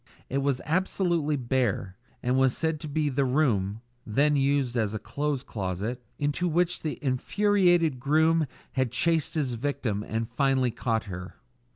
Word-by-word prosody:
It 135 - 0
was 140 -2 0
absolutely 170 -2 +1
bare, 120 -7 -1 0.3
and 125 +1 +1
was 130 -1 +3
said 160 -2 0
to 155 - -6
be 150 +1 0
the 140 0 +1
room 115 -7 +1 0.2
then 145 +7 +2
used 135 -2 +1
as 110 -3 0
a - - 0
clothes 145 +1 -2
closet 105 +4 -4
into 145 +4 0
which 175 +1 +1
the 155 - -3
infuriated 175 +2 +2
groom 160 +3 +3 0.2
had 130 -3 0
chased 165 +5 +1
his 140 -6 0
victim 115 -4 -2
and 110 +1 -3
finally 135 -2 +1
caught 115 -1 -1
her. 90 -3 -7
135 Hz, 155 wpm, -27 LUFS, 120-155 Hz, 0.3 s, was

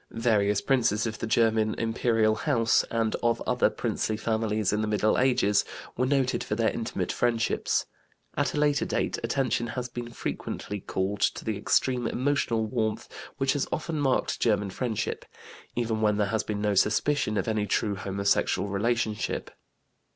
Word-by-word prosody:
Various 105 -3 +1
princes 120 -5 +2
of 110 -1 -4
the - - -3
German 110 -1 +2
Imperial 115 -1 +1
house, 115 -1 +2
and 115 -1 0
of 120 -1 +2
other - - +3
princely 110 - -2
families 110 -2 0
in 105 - +1
the 110 - -1
Middle 105 0 +2
Ages, 120 -6 +3 0.3
were 125 +2 +1
noted 135 -2 +1
for 105 - -2
their 115 0 +2
intimate 105 -5 -3
friendships. 115 -2 0 0.5
At - - 0
a - - 0
later 145 -1 +2
date, - - -1
attention 125 -3 0
has 125 +1 -4 0.2
frequently 105 -2 -4
been - - -22
called 95 +2 -1
to - - 0
the 110 - -1
extreme 120 +4 +1
emotional 125 -4 0
warmth 110 -1 -2 0.3
which 135 0 +2
has 145 - -1
often 155 0 -2
marked 135 -2 +1
German 105 -3 +1
friendship, 115 0 -2 0.5
even 115 -2 -1
when 105 -1 +2
there 105 -1 +1
has 110 -1 +1
been 105 -1 -4
no 105 -1 +1
suspicion 110 +3 +2
of - - -1
any 110 -2 0
true 100 0 0
homosexual 100 +1 0
relationship. 110 +1 -1
110 Hz, 160 wpm, -27 LUFS, 105-120 Hz, 0.5 s, other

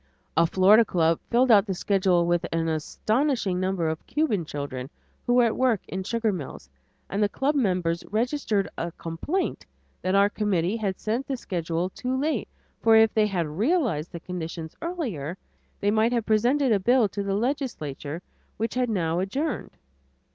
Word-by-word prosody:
A 165 +1 +4
Florida 195 +6 +6
club 165 -5 +1
filled 245 +1 +4
out 210 -1 +6
the 190 - -2
schedule 185 -2 +2
with 175 0 +1
an 165 0 0
astonishing 215 - 0
number 185 -3 0
of 160 0 -3
Cuban 250 - 0
children 140 -3 -5 0.4
who 245 - +3
were 245 - +6
at 230 -2 +1
work 250 -6 +2
in 190 - -4
sugar 230 +2 0
mills, 140 - -7 0.4
and 200 - -2
the 205 - +3
club 275 +7 0
members 180 - 0
registered 225 -3 0
a 170 +1 -3
complaint 170 - -3 0.4
that 185 +1 0
our 200 0 +6
committee 205 -3 0
had 200 -4 -2
sent 235 +5 -2
the 270 - -2
schedule 175 -3 -2
too 255 +4 -2
late, 305 +3 -1 0.3
for 225 -1 +5
if 220 -1 +5
they 215 -1 +3
had 180 -5 -1
realized 200 - 0
the 170 - -6
conditions 165 -2 -6
earlier, 220 - -4 0.4
they 205 - +1
might 220 +3 +2
have 235 -3 0
presented 245 +5 +2
a 205 - +4
bill 240 +3 +4
to 200 - -4
the 200 0 -1
legislature 180 - -3 0.3
which 225 +1 -2
had 250 -1 0
now 170 -5 0
adjourned. 275 - -3
200 Hz, 170 wpm, -26 LUFS, 170-235 Hz, 0.4 s, Florida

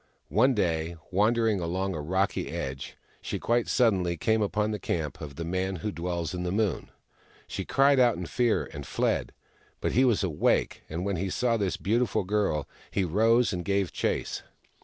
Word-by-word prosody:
One 125 +5 +4
day, 85 -4 0 0.2
wandering 110 +2 +2
along 95 +3 -1
a 80 - -4
rocky 95 +6 0
edge, 65 0 -5 0.2
she - - -3
quite 120 0 +1
suddenly 95 -8 +2
came 110 +7 +2
upon 105 +1 0
the 105 - -3
camp 80 -5 -3
of 70 -3 -7
the 85 - -4
Man 95 +2 -1
Who 105 +5 -3
Dwells 85 -1 -3
In 90 - -3
The 90 0 -2
Moon. 105 -2 0 0.6
She 95 - -5
cried 140 0 +4
out 120 -6 +4
in 90 - -4
fear, 120 +4 +1
and 75 - -6
fled. 65 - -1 0.5
But - - -1
he 130 - +4
was 120 -6 +3
awake, 85 -6 +1
and 85 +4 -3
when 100 -2 -1
he 95 +3 -2
saw 120 +5 +1
this 100 -4 -1
beautiful 115 0 +1
girl, 100 -6 0 0.2
he 95 - 0
rose 115 +6 +3
and 90 -1 -3
gave 100 0 0
chase. - - -2
95 Hz, 180 wpm, -28 LUFS, 85-110 Hz, 0.6 s, One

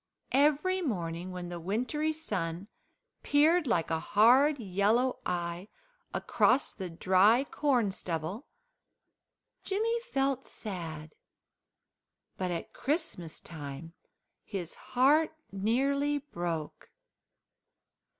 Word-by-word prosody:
Every 300 +7 +3
morning, 175 - -3
when 180 -1 -6
the 175 -1 -5
wintry 250 - -1
sun 195 - -3 0.5
peered 305 +3 +4
like 170 -8 +1
a 160 - +1
hard 255 - +5
yellow 220 +4 +1
eye 175 +1 -3 0.4
across 265 - +2
the 190 -3 -5
dry 190 +8 +4
corn 260 -8 +1
stubble, 180 - -4 1.2
Jimmy 450 +4 0
felt 275 - -1
sad, 160 -7 -7 1.2
but 185 -1 -2
at 170 -1 -4
Christmas 275 - -3
time 155 0 -8 0.5
his 180 -4 -5
heart 290 +6 +2 0.2
nearly 275 +9 +1
broke. 175 - -5
210 Hz, 90 wpm, -30 LUFS, 175-285 Hz, 1.2 s, hard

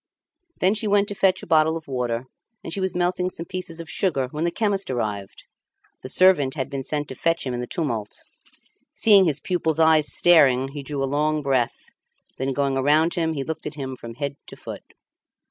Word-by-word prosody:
Then 185 +2 +3
she 215 0 -1
went 205 0 +3
to - - -3
fetch 190 -2 +1
a - - -6
bottle 160 0 +3
of 160 - -12
water, 125 -2 -2 0.4
and 165 - -4
she 195 - -2
was 190 -1 -1
melting 180 +1 0
some 170 -2 -5
pieces 175 -2 -4
of 165 - -7
sugar 140 -10 0
when 155 +2 -2
the - - +2
chemist 200 -1 -1
arrived. 105 -6 -4 0.6
The 130 - -7
servant 150 -5 +4
had 130 -4 -4
been 135 -1 -3
to 145 0 -3
fetch 165 +5 0
him 130 - -3
in 120 - -3
the 125 - -5
tumult. 115 -11 -4 0.7
Seeing 200 -4 +6
his 150 -4 +1
pupil's 160 -3 -1
eyes 160 -2 +5
staring 135 -7 +5
he 145 +1 -7
drew 140 0 -4
a - - +2
long 150 +2 0
breath; 130 -4 -1 0.5
then 135 +1 -1
going 140 0 0
around 150 +5 +3
him 165 -3 0
he 140 -3 -3
looked 160 +3 -5
at 150 - -7
him 135 -3 -5
from 115 -2 -10
head 140 +2 -4
to - - -9
foot. - - -8
150 Hz, 205 wpm, -23 LUFS, 135-175 Hz, 0.7 s, Seeing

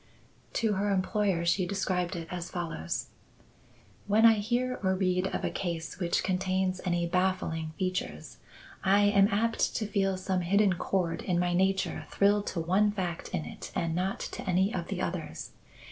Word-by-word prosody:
To 225 -2 +1
her 200 +1 0
employer 195 -2 +1
she 175 +1 +2
described 185 -2 -1
it 165 -1 -5
as 175 -1 -4
follows: 165 - -3 1.0
"When 215 +3 +5
I 225 -2 +7
hear 245 +4 -1
or 190 -1 +2
read 185 0 +1
of - - -3
a - - -1
case 170 -3 -4
which 170 -2 +1
contains 185 0 0
any 175 -1 +1
baffling 170 -3 0
features, 185 -1 -3 0.5
I 195 +1 +4
am 200 -1 +5
apt 225 +2 +1
to 220 - 0
feel 195 -2 0
some 185 0 -1
hidden 200 +2 +3
chord 175 -1 -1
in 180 -2 0
my 175 0 +1
nature 190 +1 0
thrill 205 +1 +3
to 175 - -3
one 190 +6 +3
fact 180 -5 -4
in 170 -4 -3
it - - -8
and 170 -1 0
not 185 +3 -1
to - - -5
any 190 +4 +2
of 175 -2 -3
the 195 -3 -3
others. 165 - -4
185 Hz, 170 wpm, -29 LUFS, 175-200 Hz, 1.0 s, I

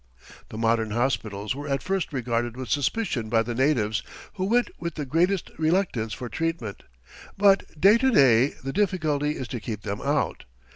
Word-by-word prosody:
The 110 - -8
modern 115 -1 +1
hospitals 110 -3 -1
were 145 +2 -7
at 135 -1 -1
first 190 -3 -1
regarded 120 -2 -2
with 130 -2 -6
suspicion 145 - -1
by 115 0 +3
the 120 +1 -4
natives, 115 -5 +1 0.3
who 185 -2 -2
went 235 +2 +2
with 170 -1 -4
the 150 - -3
greatest 170 +7 +1
reluctance 155 - +1
for 125 +3 -5
treatment. 125 -4 -3 0.6
But 195 -5 +3
to 230 - +5
day 130 - +5
the 135 0 -4
difficulty 155 -7 0
is 130 - -5
to 120 - -4
keep 105 -1 -6
them 100 0 -4
out. 140 - -1
135 Hz, 165 wpm, -25 LUFS, 115-170 Hz, 0.6 s, to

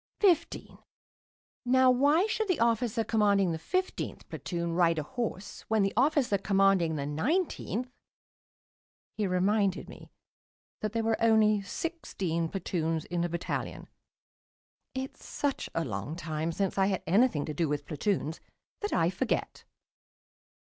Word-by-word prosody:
"Fifteen. 375 -6 +1 0.8
Now, 255 +1 +5
why 290 +8 +4
should 440 0 -1
the 365 -5 +1
officer 230 0 +2
commanding 200 -5 +3
the 160 - -3
fifteenth 370 - -3
platoon 170 -2 -3
ride 170 -1 +3
a 155 - -1
horse 210 - -5
when 220 -2 +2
the 195 - 0
officer 260 -5 +2
commanding 195 -5 +3
the 140 -2 -2
nineteenth 250 - -1 0.6
" - - -66
He 210 - +2
reminded 195 +2 +1
me - - -12 0.7
that 215 -1 -3
there 230 -1 0
were 225 0 0
only 215 -2 +4
sixteen 190 - -3
platoons 165 -4 -2
in 175 -1 -2
a 175 - -1
battalion. 170 +1 -4 1.1
It's 265 +1 -5
such 285 -2 -2
a 165 - 0
long 110 +6 -4
time 160 -1 -3
since 195 +3 -1
I 190 - +4
had 190 -2 -1
anything 195 - +3
to 155 - -4
do 160 +1 0
with 145 -1 -2
platoons 160 -1 -1 0.4
that 415 - -3
I 165 +1 +2
forget. 230 +6 -2
200 Hz, 140 wpm, -29 LUFS, 170-245 Hz, 1.1 s, Now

